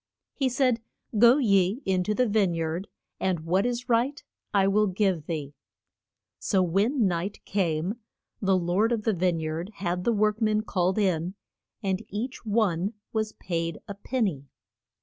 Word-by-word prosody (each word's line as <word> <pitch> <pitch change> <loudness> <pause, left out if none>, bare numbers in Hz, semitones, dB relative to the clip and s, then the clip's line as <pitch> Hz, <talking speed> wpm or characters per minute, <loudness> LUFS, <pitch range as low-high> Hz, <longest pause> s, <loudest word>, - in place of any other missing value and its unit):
He 270 -3 0
said, 250 -2 +2 0.4
Go 240 +4 +7
ye 200 -1 +2
in 185 -1 +1
to 210 - 0
the 250 +2 +2
vine 200 -5 +2
yard, 165 +3 -2 0.3
and 185 -4 0
what 185 +7 +1
is 245 0 -3
right 250 +5 +1 0.3
I 195 -1 +3
will 210 +2 +3
give 185 -5 0
thee. 150 -4 -4 0.9
So 190 -3 +2
when 205 - +2
night 185 +2 -2
came, 185 +2 -1 0.4
the 190 -2 +3
lord 185 +6 +1
of 225 -3 0
the 220 - +2
vine 180 -2 +1
yard 160 +3 -3
had 180 -1 -2
the 235 - +2
work 215 0 +1
men 215 -1 +2
called 185 -3 0
in, 185 -3 0 0.5
and 190 -1 -1
each 235 +6 -4
one 205 -3 +1 0.2
was 215 -1 -1
paid 165 -2 -3
a 200 - -5
pen 240 +5 -2
ny. 165 -10 -1
195 Hz, 165 wpm, -27 LUFS, 175-220 Hz, 0.9 s, Go